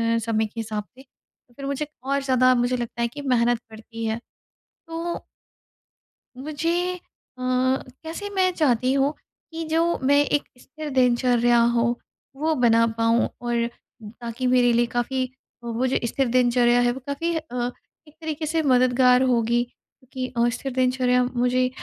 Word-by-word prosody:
अ, -, -, +2 dB
समय 220 Hz, -1 st, +1 dB
के 215 Hz, +2 st, -8 dB
हिसाब 215 Hz, -1 st, -3 dB
से, 255 Hz, +5 st, -19 dB
तो 250 Hz, -2 st, -35 dB
फिर 275 Hz, +2 st, -8 dB
मुझे 280 Hz, +2 st, -2 dB, 0.2 s
और 275 Hz, +1 st, 0 dB
ज़्यादा 255 Hz, -1 st, +4 dB
मुझे 245 Hz, +1 st, +1 dB
लगता 240 Hz, 0 st, -4 dB
है 235 Hz, -, +2 dB
कि 285 Hz, +5 st, -8 dB
मेहनत 240 Hz, -3 st, +2 dB
पड़ती 225 Hz, +1 st, -8 dB
है। 220 Hz, +1 st, -1 dB, 0.7 s
तो, 330 Hz, +1 st, -4 dB, 1.2 s
मुझे 330 Hz, +6 st, -1 dB
अ, -, -, -15 dB, 0.4 s
कैसे 260 Hz, +8 st, -2 dB
मैं 375 Hz, -1 st, +3 dB
चाहती 260 Hz, -6 st, +2 dB
हूँ 275 Hz, +2 st, +2 dB, 0.4 s
कि 325 Hz, 0 st, -4 dB
जो 330 Hz, +2 st, +1 dB
मैं 285 Hz, +2 st, +4 dB
एक 290 Hz, +1 st, 0 dB
स्थिर 305 Hz, +4 st, -8 dB
दिनचर्या 240 Hz, -1 st, +3 dB, 0.2 s
हो, 235 Hz, -, +2 dB, 0.5 s
वो 315 Hz, +3 st, 0 dB
बना 230 Hz, -4 st, +4 dB
पाऊँ 230 Hz, +1 st, +3 dB
और 235 Hz, -1 st, 0 dB, 0.5 s
ताकि 240 Hz, +2 st, -4 dB
मेरे 250 Hz, -1 st, +4 dB
लिए 240 Hz, +1 st, +3 dB
काफ़ी 250 Hz, +2 st, -1 dB, 0.4 s
वो 235 Hz, +2 st, -1 dB
जो 260 Hz, -, +1 dB
स्थिर 270 Hz, +3 st, 0 dB
दिनचर्या 245 Hz, 0 st, +3 dB
है, 245 Hz, 0 st, +3 dB
वो 265 Hz, -, -7 dB
काफ़ी 330 Hz, +4 st, -2 dB
अ, 250 Hz, -6 st, -3 dB, 0.4 s
एक 300 Hz, -, -19 dB
तरीके 315 Hz, -1 st, -4 dB
से 320 Hz, +1 st, 0 dB
मददगार 250 Hz, -2 st, +4 dB
होगी 240 Hz, -2 st, +2 dB
क्योंकि 255 Hz, +1 st, -9 dB
अ, 235 Hz, 0 st, +3 dB
स्थिर 270 Hz, -, -5 dB
दिनचर्या 255 Hz, -1 st, +2 dB
मुझे 250 Hz, 0 st, +1 dB
255 Hz, 155 wpm, -24 LUFS, 240-280 Hz, 1.2 s, ज़्यादा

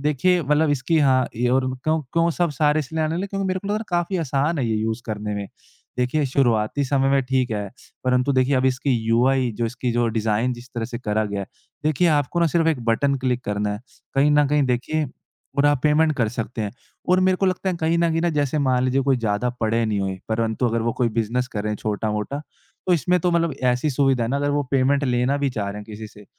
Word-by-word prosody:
देखिए 150 Hz, +5 st, +2 dB
मतलब 150 Hz, +2 st, +2 dB
इसकी 145 Hz, +3 st, +1 dB
हाँ, 130 Hz, -3 st, +3 dB
ये 120 Hz, +1 st, +1 dB
और 130 Hz, +1 st, +2 dB, 0.2 s
क्यों 155 Hz, +1 st, +2 dB
क्यों 170 Hz, 0 st, +2 dB
सब 175 Hz, -, +3 dB
सारे 150 Hz, +1 st, +3 dB
इसलिए 160 Hz, +3 st, -3 dB
आने 155 Hz, +2 st, -1 dB
लगे 190 Hz, -, -2 dB
क्योंकि 195 Hz, -1 st, -3 dB
मेरे 185 Hz, 0 st, -1 dB
को 200 Hz, -, -9 dB
लग -, -, 0 dB
रहा 210 Hz, -, 0 dB
है 225 Hz, -, -6 dB
काफ़ी 175 Hz, +1 st, 0 dB
आसान 145 Hz, +2 st, 0 dB
है 125 Hz, -, 0 dB
ये 110 Hz, -, 0 dB
यूज़ 110 Hz, +2 st, -2 dB
करने 105 Hz, -1 st, -3 dB
में। 100 Hz, -1 st, -4 dB, 0.5 s
देखिए, 135 Hz, +4 st, +1 dB
शुरुआती 125 Hz, 0 st, +1 dB
समय 135 Hz, 0 st, +1 dB
में 135 Hz, 0 st, +3 dB
ठीक 130 Hz, -1 st, 0 dB
है। 105 Hz, -2 st, -2 dB, 0.4 s
परंतु 125 Hz, +2 st, +2 dB
देखिए 130 Hz, +1 st, +2 dB
अब 130 Hz, -, +1 dB
इसकी 130 Hz, +2 st, 0 dB, 0.2 s
यूआई 125 Hz, +2 st, +3 dB
जो 115 Hz, -, +1 dB
इसकी 120 Hz, +1 st, -3 dB
जो 120 Hz, 0 st, +1 dB
डिज़ाइन 110 Hz, +3 st, +1 dB
जिस 120 Hz, +1 st, -10 dB
तरह 115 Hz, -1 st, -2 dB
से 120 Hz, 0 st, -5 dB
करा 110 Hz, -2 st, -1 dB
गया 100 Hz, -1 st, -3 dB
है। 95 Hz, -, -5 dB, 0.4 s
देखिए 155 Hz, +3 st, +2 dB
आपको 145 Hz, +4 st, 0 dB
ना 170 Hz, -, +4 dB
सिर्फ 165 Hz, +1 st, +1 dB
एक 155 Hz, -6 st, +1 dB
बटन 140 Hz, +5 st, +2 dB
क्लिक 125 Hz, -1 st, -1 dB
करना 105 Hz, 0 st, -1 dB
है। 105 Hz, -, -8 dB, 0.3 s
कहीं 140 Hz, +2 st, +4 dB
न 145 Hz, -1 st, +4 dB
कहीं 150 Hz, 0 st, +2 dB
देखिए 135 Hz, +4 st, 0 dB, 0.5 s
और 145 Hz, -, +5 dB
आप 145 Hz, -3 st, +2 dB
पेमेंट 155 Hz, +1 st, +3 dB
कर 115 Hz, -4 st, +1 dB
सकते 115 Hz, 0 st, -5 dB
हैं 105 Hz, -, -3 dB, 0.4 s
और 180 Hz, +1 st, +4 dB
मेरे 185 Hz, -, +2 dB
को 195 Hz, -, +1 dB
लगता 185 Hz, +1 st, -1 dB
है 180 Hz, -, -3 dB
कहीं 165 Hz, +1 st, +1 dB
न 170 Hz, -1 st, +2 dB
कहीं 175 Hz, 0 st, +1 dB
जैसे 145 Hz, -1 st, 0 dB
मान 125 Hz, -1 st, +2 dB
लीजिए 130 Hz, +1 st, +2 dB
कोई 135 Hz, -1 st, +2 dB
ज़्यादा 115 Hz, +1 st, -1 dB
पढ़े 115 Hz, +1 st, +1 dB
नहीं 105 Hz, -2 st, -1 dB
हुए 95 Hz, -1 st, -3 dB
परंतु 110 Hz, +2 st, 0 dB
अगर 115 Hz, 0 st, -1 dB
वो 115 Hz, 0 st, 0 dB
कोई 120 Hz, -, +3 dB
बिज़नेस 125 Hz, +3 st, 0 dB
कर 105 Hz, -2 st, -4 dB
रहे 105 Hz, -, -2 dB
हैं -, -, -3 dB
छोटा-मोटा। 105 Hz, +7 st, -3 dB, 0.4 s
तो 180 Hz, -, +3 dB
इसमें 180 Hz, +2 st, +2 dB
तो 175 Hz, +1 st, +1 dB
मतलब 170 Hz, -2 st, +1 dB
ऐसी 125 Hz, +5 st, +1 dB
सुविधा 135 Hz, -3 st, +2 dB
है -, -, -2 dB
ना 140 Hz, -, +1 dB
अगर 145 Hz, 0 st, 0 dB
वो 145 Hz, 0 st, +1 dB
पेमेंट 140 Hz, +1 st, +2 dB
लेना 125 Hz, +2 st, +1 dB
भी 140 Hz, -1 st, 0 dB
चाह 105 Hz, -5 st, -3 dB
रहे 100 Hz, -, -5 dB
हैं 105 Hz, -, -7 dB
किसी 110 Hz, 0 st, -8 dB
से 105 Hz, -1 st, -15 dB
130 Hz, 250 wpm, -22 LUFS, 115-150 Hz, 0.5 s, और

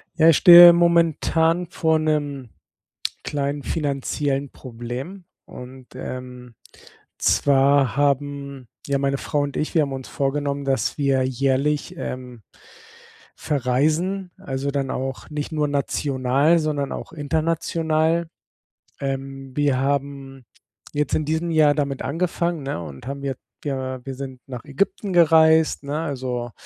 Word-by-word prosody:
Ja, 165 Hz, -1 st, +5 dB
ich 160 Hz, -, +5 dB
stehe 175 Hz, 0 st, +10 dB
momentan 170 Hz, 0 st, +2 dB
vor 160 Hz, -2 st, +1 dB
'nem 145 Hz, -5 st, -2 dB, 0.8 s
kleinen 145 Hz, 0 st, -2 dB
finanziellen 140 Hz, -1 st, -2 dB
Problem 130 Hz, +9 st, -8 dB, 0.2 s
und, 125 Hz, 0 st, -11 dB
ähm, 125 Hz, -1 st, -8 dB, 0.6 s
zwar 135 Hz, -3 st, +3 dB
haben 140 Hz, -2 st, -1 dB, 0.2 s
ja, 140 Hz, 0 st, +1 dB
meine 140 Hz, 0 st, 0 dB
Frau 145 Hz, -, -2 dB
und 140 Hz, -1 st, -4 dB
ich, 155 Hz, -, -2 dB
wir 160 Hz, -, +4 dB
haben 140 Hz, -2 st, -3 dB
uns 130 Hz, -1 st, -6 dB
vorgenommen, 140 Hz, 0 st, -2 dB
dass 135 Hz, -1 st, 0 dB
wir 135 Hz, -2 st, +2 dB
jährlich, 135 Hz, +6 st, 0 dB
ähm, 125 Hz, -6 st, -7 dB, 0.9 s
verreisen. 155 Hz, +8 st, 0 dB
Also, 135 Hz, +1 st, -3 dB
dann 135 Hz, -1 st, -2 dB
auch 130 Hz, 0 st, -5 dB
nicht 150 Hz, -1 st, -4 dB
nur 150 Hz, -1 st, 0 dB
national, 140 Hz, +2 st, +1 dB
sondern 145 Hz, -3 st, -2 dB
auch -, -, -7 dB
international. 160 Hz, +1 st, 0 dB, 0.7 s
Ähm, 135 Hz, 0 st, -5 dB
wir 145 Hz, -3 st, +2 dB
haben 135 Hz, -1 st, -3 dB, 0.5 s
jetzt 145 Hz, -1 st, 0 dB
in 155 Hz, -, 0 dB
diesem 160 Hz, +2 st, -1 dB
Jahr 155 Hz, -2 st, +4 dB
damit 140 Hz, -2 st, -2 dB
angefangen, 170 Hz, 0 st, -2 dB
ne, 135 Hz, -10 st, -3 dB
und 70 Hz, -, -10 dB
haben 140 Hz, 0 st, -6 dB
ja 135 Hz, -1 st, -2 dB, 0.3 s
wir 130 Hz, -2 st, -4 dB
wir 135 Hz, -, -5 dB
sind 130 Hz, -1 st, -8 dB
nach 125 Hz, -3 st, -8 dB
Ägypten 190 Hz, +7 st, -2 dB
gereist, 160 Hz, -2 st, +5 dB
ne? 145 Hz, +2 st, -3 dB
Also, 125 Hz, -6 st, -4 dB
140 Hz, 130 wpm, -22 LUFS, 135-155 Hz, 0.9 s, stehe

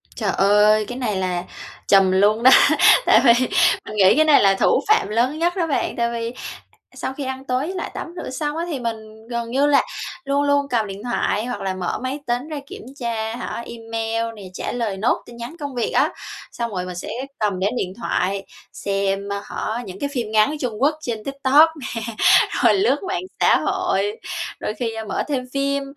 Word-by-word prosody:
Trời 210 Hz, -4 st, -1 dB
ơi, 210 Hz, +2 st, +4 dB
cái 245 Hz, -, -6 dB
này 235 Hz, -6 st, -2 dB
là 180 Hz, -2 st, -1 dB, 0.4 s
trùm 195 Hz, -1 st, +5 dB
luôn 205 Hz, +4 st, +3 dB
đó, 260 Hz, -, +8 dB, 0.5 s
tại -, -, +6 dB
vì 235 Hz, -, +8 dB, 0.5 s
mình 215 Hz, -, -7 dB
nghĩ 195 Hz, -2 st, +5 dB
cái 310 Hz, -, +4 dB
này 305 Hz, -2 st, +6 dB
là 195 Hz, -1 st, +5 dB
thủ -, -, +3 dB
phạm 430 Hz, -, +3 dB
lớn 245 Hz, +8 st, 0 dB
nhất 345 Hz, +1 st, +1 dB
đó 345 Hz, -4 st, 0 dB
bạn. 290 Hz, -, -1 dB
Tại 235 Hz, 0 st, 0 dB
vì, 230 Hz, 0 st, -3 dB, 0.4 s
à, -, -, -29 dB
sau 265 Hz, -, -4 dB
khi 280 Hz, -, -6 dB
ăn 265 Hz, 0 st, -5 dB
tối 255 Hz, +1 st, -1 dB
với 370 Hz, +4 st, -5 dB
lại -, -, -4 dB
tắm -, -, -5 dB, 0.2 s
rửa -, -, -6 dB
xong 295 Hz, +3 st, -3 dB
á, 335 Hz, -, -2 dB
thì 305 Hz, -6 st, -3 dB
mình 220 Hz, -2 st, -6 dB
gần 235 Hz, -1 st, -3 dB
như 275 Hz, +3 st, +2 dB
là 290 Hz, -1 st, +5 dB, 0.4 s
luôn 280 Hz, +1 st, +1 dB
luôn 285 Hz, 0 st, +2 dB
cầm 225 Hz, -4 st, 0 dB
điện 195 Hz, +1 st, -8 dB
thoại, 240 Hz, -2 st, -1 dB
hoặc 245 Hz, -, -4 dB
là 190 Hz, -1 st, -2 dB
mở 185 Hz, -1 st, -3 dB
máy 260 Hz, +3 st, -3 dB
tính 245 Hz, +4 st, -1 dB
ra 305 Hz, -2 st, -4 dB
kiểm -, -, -9 dB, 0.2 s
tra 225 Hz, -2 st, -3 dB
hả, 235 Hz, -1 st, -5 dB
email 225 Hz, 0 st, -3 dB
nè, 205 Hz, -, -11 dB
trả -, -, -4 dB
lời 225 Hz, -5 st, -2 dB
nốt 215 Hz, +5 st, 0 dB
tin 235 Hz, -, -13 dB
nhắn 235 Hz, +7 st, -7 dB
công 285 Hz, -3 st, -5 dB
việc 240 Hz, -, -1 dB
á. -, -, +3 dB, 0.4 s
Xong 235 Hz, -1 st, -4 dB
rồi 180 Hz, -2 st, -3 dB
mình 180 Hz, -1 st, -7 dB
sẽ 175 Hz, -, -6 dB, 0.3 s
cầm 205 Hz, -4 st, 0 dB
đến 200 Hz, +6 st, 0 dB
điện 185 Hz, -5 st, -3 dB
thoại, 195 Hz, -4 st, -1 dB, 0.3 s
xem, 195 Hz, 0 st, -2 dB
a 200 Hz, -, -3 dB
hả, 230 Hz, +3 st, -4 dB
những 190 Hz, 0 st, -9 dB
cái 285 Hz, -, -2 dB
phim 235 Hz, -5 st, -3 dB
ngắn, 215 Hz, +1 st, +4 dB
ơ, 300 Hz, -, -3 dB
Trung 235 Hz, -4 st, -3 dB
Quốc 295 Hz, +3 st, +3 dB
trên 225 Hz, -6 st, -4 dB
TikTok 275 Hz, +4 st, +4 dB
nè, -, -, -5 dB, 0.8 s
rồi -, -, +6 dB
lướt 400 Hz, +1 st, +1 dB
mạng 365 Hz, -1 st, -2 dB, 0.2 s
xã -, -, +5 dB
hội, 290 Hz, -, -1 dB, 0.4 s
đôi -, -, -3 dB
khi, 225 Hz, +1 st, -3 dB
ơ, 220 Hz, 0 st, -6 dB
mở 205 Hz, -, -2 dB
thêm 270 Hz, -4 st, -2 dB
phim, 280 Hz, 0 st, 0 dB
235 Hz, 220 wpm, -21 LUFS, 210-275 Hz, 0.8 s, đó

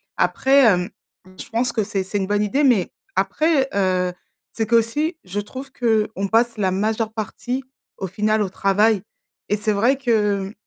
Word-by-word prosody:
Après, 270 Hz, +1 st, +3 dB
hem, 180 Hz, -5 st, +3 dB, 0.5 s
je -, -, -9 dB
pense 235 Hz, +1 st, -1 dB
que 220 Hz, -, +1 dB
c'est 200 Hz, -2 st, -2 dB
c'est 200 Hz, +2 st, -3 dB
une 190 Hz, -1 st, -1 dB
bonne 205 Hz, +1 st, +1 dB
idée, 265 Hz, +8 st, +1 dB
mais 235 Hz, -10 st, +3 dB, 0.3 s
après, 270 Hz, -, +2 dB
heu, 185 Hz, -2 st, +1 dB, 0.4 s
c'est 225 Hz, -, -1 dB
qu'aussi 235 Hz, -, +1 dB
je 190 Hz, +3 st, -3 dB
trouve 260 Hz, +6 st, -9 dB
qu'on 220 Hz, -5 st, 0 dB
passe 230 Hz, +1 st, +2 dB
la 190 Hz, -3 st, +1 dB
majeure 215 Hz, +3 st, -1 dB
partie 235 Hz, +4 st, -4 dB, 0.3 s
au 190 Hz, -, -4 dB
final 215 Hz, +4 st, 0 dB
au 205 Hz, -, +1 dB
travail. 200 Hz, +2 st, +2 dB, 0.5 s
Et 210 Hz, -, +1 dB
c'est 210 Hz, +1 st, 0 dB
vrai 235 Hz, +7 st, +2 dB
que, 210 Hz, -6 st, +1 dB
mmh, 200 Hz, -, -10 dB
215 Hz, 175 wpm, -21 LUFS, 200-235 Hz, 0.5 s, Après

